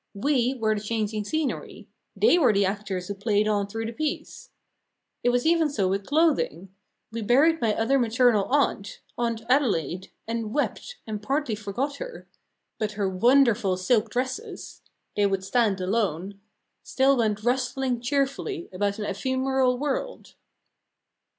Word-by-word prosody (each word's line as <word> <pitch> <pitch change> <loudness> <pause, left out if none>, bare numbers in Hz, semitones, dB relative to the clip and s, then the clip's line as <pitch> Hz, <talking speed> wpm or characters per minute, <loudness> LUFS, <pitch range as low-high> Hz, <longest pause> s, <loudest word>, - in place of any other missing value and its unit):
We 255 +3 +1
were 220 -3 +1
the 210 - -3
changing 215 -1 -2
scenery; 315 +5 -3 0.3
they 355 - +4
were 265 -8 +5
the 200 -1 +2
actors 195 -2 -3
who 200 - -3
played 205 +1 +1
on 205 -2 +1
through 225 +2 -4
the 225 - -3
piece. 300 +5 -4 0.7
It 245 - +3
was 245 0 +1
even 325 -1 +3
so 210 -9 0
with 195 +1 -2
clothing. 280 - +1 0.4
We 230 0 -4
buried 285 +9 +3
my 220 -3 +2
other 270 +5 +2
maternal 235 -3 +3
aunt 255 -7 0 0.2
Aunt 230 -2 -2
Adelaide 190 - +1 0.2
and 230 0 -3
wept, 395 +10 -2
and 215 -2 -5
partly 275 +2 -1
forgot 215 +7 -3
her; - - -8 0.5
but 210 -1 -2
her 205 -2 -1
wonderful 225 -1 +3
silk 220 +4 +1
dresses 255 +3 -4 0.3
they 205 -1 +3
would 195 -1 -1
stand 210 -1 +1
alone 195 -1 -2 0.4
still 270 +1 +2
went 215 -3 0
rustling 255 0 0
cheerfully 280 - -2
about 200 +2 -1
an 210 - -4
ephemeral 260 +4 0
world. 295 - -3
230 Hz, 145 wpm, -26 LUFS, 205-265 Hz, 0.7 s, were